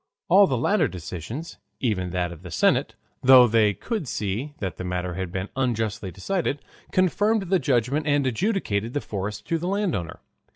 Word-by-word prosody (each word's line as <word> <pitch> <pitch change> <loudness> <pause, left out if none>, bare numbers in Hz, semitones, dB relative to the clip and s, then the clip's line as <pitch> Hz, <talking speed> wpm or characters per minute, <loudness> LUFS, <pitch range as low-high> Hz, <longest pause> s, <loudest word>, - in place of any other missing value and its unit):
All 195 +3 +7
the 130 - 0
later 160 - +2
decisions, 95 - -7 0.2
even 100 -8 -1
that 90 -1 -1
of 85 -1 -10
the 90 - -9
senate, - - +2 0.3
though 130 -1 +8
they 110 -3 +3
could 220 - -4
see 115 +8 -3
that 95 -5 -4
the - - -5
matter 90 0 -3
had 95 -1 -4
been 95 +2 -4
unjustly 115 -5 -1
decided, 145 - -2 0.3
confirmed 205 +4 +2
the 190 - +4
judgment 135 +2 +1
and 145 -1 +2
adjudged 125 - -1
the - - +2
forest 105 +1 -5
to 165 -1 +1
the 175 - -3
landowner. 185 - -2
120 Hz, 170 wpm, -25 LUFS, 95-160 Hz, 0.3 s, though